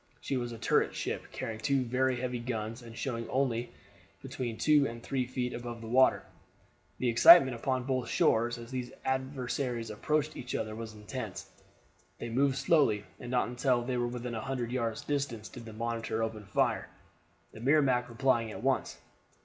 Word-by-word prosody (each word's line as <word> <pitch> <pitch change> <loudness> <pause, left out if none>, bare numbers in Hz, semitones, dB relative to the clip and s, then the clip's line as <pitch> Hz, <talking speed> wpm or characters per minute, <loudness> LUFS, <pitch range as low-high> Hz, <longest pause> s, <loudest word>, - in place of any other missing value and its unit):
She 135 - -3
was 120 -2 -2
a 115 - -7
turret - - +1
ship, - - -3
carrying 110 -1 -5
two 135 +3 +1
very 130 +2 +1
heavy 125 -1 -2
guns, 115 -1 -4
and 115 -1 -11
showing 115 -3 -3
only 125 -3 0 0.5
between 120 -3 -4
two 150 -2 +4
and 115 0 -8
three 130 -2 -1
feet 125 -1 -2
above 120 -1 -6
the 115 - -8
water. 130 +3 +4 0.7
The 130 - -1
excitement 130 +4 +8
upon 130 +2 -1
both 130 -1 -1
shores 120 +2 +2
as 115 +1 -10
these 125 -1 -4
adversaries 130 -3 -2
approached 150 +7 0
each 125 - -5
other 110 -1 -2
was 110 0 -7
intense. 105 0 -6 0.7
They 115 - -5
moved 135 +3 +2
slowly, 135 -12 +3
and 120 - -7
not 125 0 +1
until 125 0 +1
they 125 0 -2
were 120 0 0
within 120 0 -5
a 110 - -3
hundred 125 -2 -3
yards 115 -3 -2
distance 135 -7 -2
did 120 -2 -10
the 110 - -9
Monitor 115 0 -2
open 110 -2 -4
fire, 100 - 0 0.6
the - - -11
Merrimac 130 -2 +3
replying 120 -1 +1
at 105 0 -8
once. 135 0 0
120 Hz, 175 wpm, -31 LUFS, 115-130 Hz, 0.7 s, excitement